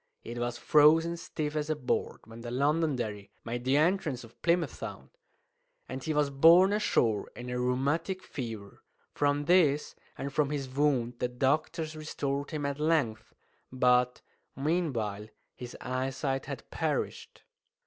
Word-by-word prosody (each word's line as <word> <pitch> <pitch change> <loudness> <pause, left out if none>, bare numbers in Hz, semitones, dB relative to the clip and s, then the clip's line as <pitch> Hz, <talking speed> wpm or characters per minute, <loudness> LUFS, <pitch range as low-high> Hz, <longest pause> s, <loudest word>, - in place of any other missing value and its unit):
It 120 +1 -6
was 120 0 -2
frozen 160 +5 +5
stiff 155 -3 -4
as 150 0 -1
a 155 - +1
board 130 -4 -2
when 115 +1 -11
the 120 - -6
Londonderry 130 -6 0 0.2
made 120 +1 -4
the 135 +2 +3
entrance 155 -5 +1
of 115 0 -16
Plymouth 170 0 +2
Sound; - - -8 0.8
and 130 - -6
he 160 - -2
was 150 -2 +1
borne 170 +8 +6
ashore 115 - +1
in 125 0 -7
a 125 - -2
rheumatic 145 +9 0
fever. 110 -6 -7 0.3
From 145 0 +1
this, 150 -4 +3 0.2
and 140 0 -5
from 150 -2 +2
his 145 -2 -3
wound, 130 -3 0
the 125 - +1
doctors 155 +5 -1
restored 145 -2 -3
him 150 -3 -3
at 140 0 -2
length, 140 -9 0 0.4
but 125 -1 +2 0.3
meanwhile 130 - -1 0.3
his 125 -1 -8
eyesight 130 +1 -2
had - - -7
perished. - - -3
140 Hz, 145 wpm, -30 LUFS, 125-155 Hz, 0.8 s, borne